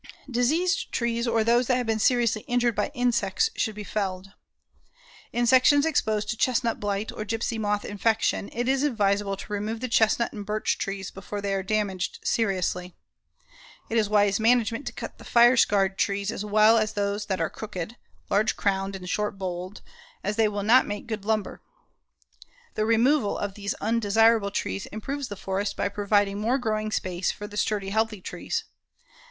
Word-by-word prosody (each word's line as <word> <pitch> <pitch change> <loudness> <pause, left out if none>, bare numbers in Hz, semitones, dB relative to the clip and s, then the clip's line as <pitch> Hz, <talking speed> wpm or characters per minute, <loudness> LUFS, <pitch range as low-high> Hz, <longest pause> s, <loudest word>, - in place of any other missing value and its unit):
Diseased 320 +11 +1
trees 235 0 -1
or 230 -1 +2
those 235 +2 +3
that 255 - +3
have 250 - -1
been 225 -1 0
seriously 235 -1 +2
injured 240 -1 +2
by - - -1
insects 245 - +1
should 220 -3 -1
be 210 - -6
felled. 195 -2 -3 1.0
In 240 0 +1
sections 260 +4 +5
exposed 215 -9 0
to 230 - -4
chestnut 240 -1 +1
blight 205 +1 -2
or - - -5
gypsy 225 +1 -2
moth 210 -1 -1
infection, 215 0 0
it 240 +1 -2
is 265 0 +2
advisable 205 -7 +1
to 210 - -8
remove 215 +2 -3
the 255 - -3
chestnut 230 0 +2
and 205 - -6
birch 210 +1 -1
trees 195 -2 -4
before 195 +2 -6
they 200 -1 -2
are 195 - 0
damaged 195 -2 -2
seriously. 185 -4 -1 1.0
It 230 - +1
is 210 -2 0
wise 205 -1 +3
management 230 +2 +2
to - - -2
cut - - -8
the - - -12
fire 240 +1 +5
scarred 195 -4 +2
trees 200 +1 0
as 210 - -5
well 215 +2 +5
as 215 -1 -1
those 205 0 -2
that 190 -3 -1
are 165 - -1
crooked, 210 0 -6 0.3
large 210 +3 +2
crowned 195 0 0
and 180 -1 -8
short 210 +2 -2
boled, 185 +1 -5 0.4
as 205 - -1
they 220 0 +3
will 205 -1 -3
not 240 +5 +5
make 205 0 -5
good 220 -4 -5
lumber. 215 -1 -1 1.1
The 215 - 0
removal 230 +1 +3
of 205 -1 -3
these 200 0 -4
undesirable 225 -1 +3
trees 95 - -3
improves 270 +6 -5
the 205 - -6
forest 195 +1 -3
by 200 - 0
providing 205 0 +1
more 235 +5 +1
growing 215 -3 -2
space 185 -3 -1
for 205 - -8
the 205 0 -10
sturdy, 205 -2 -1
healthy 220 0 0
trees. - - -4
215 Hz, 180 wpm, -26 LUFS, 200-230 Hz, 1.1 s, sections